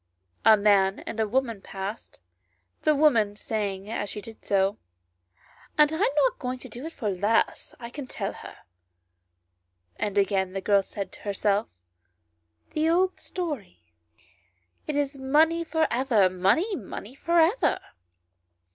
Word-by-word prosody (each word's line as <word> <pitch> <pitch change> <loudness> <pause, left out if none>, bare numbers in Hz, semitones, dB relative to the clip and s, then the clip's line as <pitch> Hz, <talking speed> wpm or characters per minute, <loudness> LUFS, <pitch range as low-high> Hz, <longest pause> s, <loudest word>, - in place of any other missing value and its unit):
A 220 -1 +8
man 200 -1 +3
and 225 - -6
woman 240 -5 0
passed, 195 - -7 0.6
the 305 - +3
woman 230 -9 +3
saying 205 -3 -3
as 210 -2 -3
she 210 - -5
did 225 +2 -11
so 195 +1 +1 0.5
" 90 - -28
I 300 - +8
am 295 - +2
not - - +2
going 255 -1 -3
to 255 - -9
do 245 +6 -7
it - - -7
for 215 -6 -2
less, 205 +5 0
I 235 -1 -8
can 280 -1 -7
tell - - -3
her; - - -11 0.8
" 90 0 -49
and 205 -1 -2
again 190 -1 +1
the 195 - -2
girl 200 +1 +4
said 195 0 -6
to - - -12
herself 205 +1 0 0.5
" 85 0 -47
The 310 +1 +2
old 370 +2 +2
story, 205 - -6 0.9
it 300 - -2
is 285 -1 -1
money 315 +5 +3
for 320 -1 +1
ever, 230 -7 +3
money, 200 - +2
money, 215 - -7
for 340 +5 +1
ever 350 +10 +3
215 Hz, 150 wpm, -26 LUFS, 195-295 Hz, 0.9 s, A